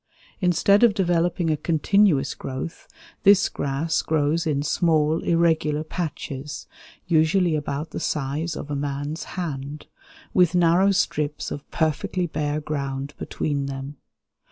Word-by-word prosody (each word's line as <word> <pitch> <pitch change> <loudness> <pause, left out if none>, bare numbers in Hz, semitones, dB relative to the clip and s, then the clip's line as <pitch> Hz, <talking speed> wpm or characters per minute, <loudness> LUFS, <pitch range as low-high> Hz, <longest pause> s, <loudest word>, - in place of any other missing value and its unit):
Instead 185 +2 +3
of 235 -4 +5
developing 175 -3 +1
a - - +2
continuous 160 -1 +2
growth, 135 +5 -6 0.3
this 200 -1 +6
grass 145 +4 -1
grows 160 +2 0
in 145 -2 0
small, 155 0 +2
irregular 160 -3 +2
patches, 150 -3 -5 0.4
usually 165 +1 +3
about 145 +1 -3
the - - -4
size 150 +3 -2
of 145 - -6
a - - -1
man's 145 +2 -3
hand, 150 -4 -4 0.5
with 180 -1 +4
narrow 175 +3 +4
strips 150 -6 -1
of 145 - -7
perfectly 160 +3 -1
bare 150 -2 -2
ground 140 -2 -4
between 140 -2 -2
them. 135 +1 -6
155 Hz, 125 wpm, -24 LUFS, 145-170 Hz, 0.5 s, this